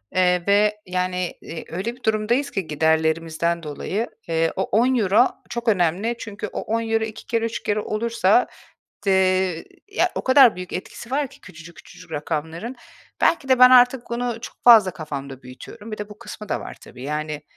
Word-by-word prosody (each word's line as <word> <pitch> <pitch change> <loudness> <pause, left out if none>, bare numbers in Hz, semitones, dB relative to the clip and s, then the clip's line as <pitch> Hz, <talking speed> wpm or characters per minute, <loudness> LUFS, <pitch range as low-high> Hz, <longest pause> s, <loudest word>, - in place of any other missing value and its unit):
Eee, 180 -1 +3
ve, 210 +1 +3
yani, 180 -1 -2
eee, 165 - -8
öyle 195 +8 -4
bir 255 - -24
durumdayız 230 +6 0
ki 195 - -3
giderlerimizden 160 +2 0
dolayı, 185 +9 -3 0.2
eee, 165 0 +1
o 190 - 0
€10 230 0 +3 0.2
çok 235 0 -5
önemli. 195 +3 +1
Çünkü 210 -1 -6
o - - -5
€10 225 0 -1
2 220 -1 -7
kere, 230 -1 -1
3 230 - -4
kere 210 0 0
olursa, 215 0 +1 0.6
eee, 185 -3 +2 0.2
ya, 410 - +1
o - - -4
kadar 260 -5 +6
büyük 180 0 -8
etkisi 230 +5 -7
var 285 +2 0
ki - - -18
küçücük 170 -2 -13
küçücük 160 - -14
rakamların. 160 - -4 0.4
Belki 275 -5 +2
de 260 -1 +4
ben 250 0 +9
artık 250 0 +6
bunu 240 -1 -2
çok - - -9
fazla 225 -6 +8
kafamda 140 -4 -7
büyütüyorum. 205 - -11
Bir 215 - -5
de 210 0 -6
bu 210 - -13
kısmı 210 -2 -9
da - - -1
var - - -9
tabii. 125 - -13
Yani, 150 +1 -4
200 Hz, 175 wpm, -22 LUFS, 165-230 Hz, 0.6 s, ben